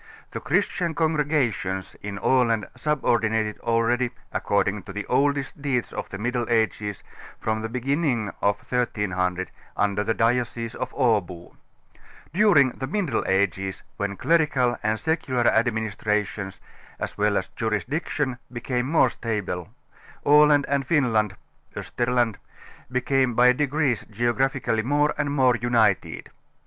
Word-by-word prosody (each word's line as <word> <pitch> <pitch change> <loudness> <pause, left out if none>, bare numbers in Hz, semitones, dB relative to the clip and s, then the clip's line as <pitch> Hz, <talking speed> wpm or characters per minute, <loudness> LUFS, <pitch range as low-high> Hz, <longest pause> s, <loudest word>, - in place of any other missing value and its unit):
The - - -4
christian 170 -3 0
congregations 145 - 0
in 100 -1 -5
Aland 115 -1 +2
subordinated 110 -7 0
already, 120 +2 +1 0.2
according 100 0 0
to - - -4
the 105 +1 -4
oldest 140 +1 0
deeds 135 -4 -1
of - - -5
the 95 - -6
Middle 120 +3 -2
Ages, 110 -3 0 0.4
from 110 0 -1
the 115 - -4
beginnig 125 -2 0
of 100 0 +2
1300 95 -7 -1 0.3
under 105 0 +1
the 115 - 0
diocese 115 0 0
of 130 +1 -4
Abo. 100 -9 0 0.8
During 170 -9 +5
the 130 - -5
Middle 170 - -1
Ages, 95 0 0
when 100 -1 -3
clerical 150 -7 +2
and 110 +1 0
secular 150 -7 0
administrations, 105 -4 0 0.4
as - - -5
well 105 0 +2
as 95 - -2
jurisdiction, 125 +4 -2
became 125 +1 -2
more 145 -4 +4
stabile, 100 -6 -3 0.6
Aland 145 0 +6
and 140 -1 +1
Finland 115 - +1 0.4
(Osterland) 120 -3 0 0.5
became 130 -1 +1
bj^ 125 +1 +5
degrees 145 -3 0
geographically 120 +1 0
more 145 +5 +2
and 145 -1 0
more 130 -3 +3
united. 115 -1 +1
120 Hz, 120 wpm, -24 LUFS, 105-135 Hz, 0.8 s, Aland